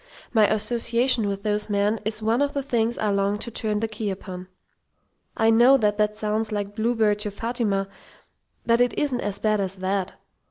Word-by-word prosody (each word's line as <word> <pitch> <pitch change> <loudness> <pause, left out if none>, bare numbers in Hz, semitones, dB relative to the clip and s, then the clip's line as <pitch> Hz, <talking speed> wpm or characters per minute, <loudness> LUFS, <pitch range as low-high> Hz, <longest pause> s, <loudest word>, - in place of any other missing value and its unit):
my 215 -3 +5
association 230 +2 +2
with 200 0 -4
those 210 0 -1
men 205 +2 +1
is 215 0 -2
one 225 +4 +1
of 285 0 0
the 280 - -2
things 235 -3 0
I 210 -1 0
long 200 +1 0
to 235 +3 -5
turn 215 -1 -2
the 225 - 0
key 215 -1 -4
upon. 185 -1 -7 0.9
I 225 0 +4
know 240 +4 +6
that 210 -4 +1
that 210 0 0
sounds 215 +1 -2
like 205 -1 -3
Bluebeard 220 -2 +1
to 210 - -3
Fatima, 205 -2 -2 0.8
but 235 +1 +3
it 245 -2 +1
isn't 265 -4 0
as 205 -1 -3
bad 215 0 +1
as 195 -1 -3
that. 190 0 -2
215 Hz, 190 wpm, -24 LUFS, 205-230 Hz, 0.9 s, know